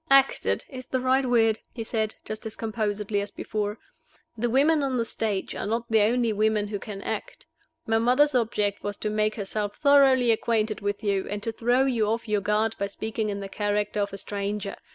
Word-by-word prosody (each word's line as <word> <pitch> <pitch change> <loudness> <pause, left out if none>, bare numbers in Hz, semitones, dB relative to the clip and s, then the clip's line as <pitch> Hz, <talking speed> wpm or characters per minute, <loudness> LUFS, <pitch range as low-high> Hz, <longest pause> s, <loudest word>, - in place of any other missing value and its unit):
"'Acted' 275 0 +3
is 255 -2 -9
the 260 - -1
right 260 +1 +2
word," 225 -3 +3
he 230 - -5
said, 220 -1 -1
just 215 +1 -5
as 220 - -8
composedly 210 -2 -2
as 200 - -4
before. 210 +1 -3 0.6
"The 235 +1 -1
women 290 +5 +4
on 265 -2 0
the 230 - 0
stage 215 -3 -2
are - - -4
not 230 +2 -1
the 220 -1 +5
only 230 +1 +2
women 210 0 +1
who 205 -1 -3
can 200 -1 -7
act. - - -5 0.4
My 225 0 +2
mother's 255 +5 +4
object 210 -4 0
was 205 0 -4
to 210 - -2
make 215 0 +1
herself 205 0 -3
thoroughly 270 -4 +5
acquainted 220 -1 0
with 205 +1 -2
you, 200 -2 0
and 205 0 -4
to 225 - -1
throw 245 +4 +2
you 235 -5 +1
off 230 +2 -1
your 210 -1 +1
guard 215 +3 +1
by 200 - 0
speaking 220 +1 -3
in 200 -1 -3
the 195 - -5
character 205 +1 -1
of 200 - -1
a 195 - -6
stranger. 200 0 -3
220 Hz, 205 wpm, -26 LUFS, 205-240 Hz, 0.6 s, the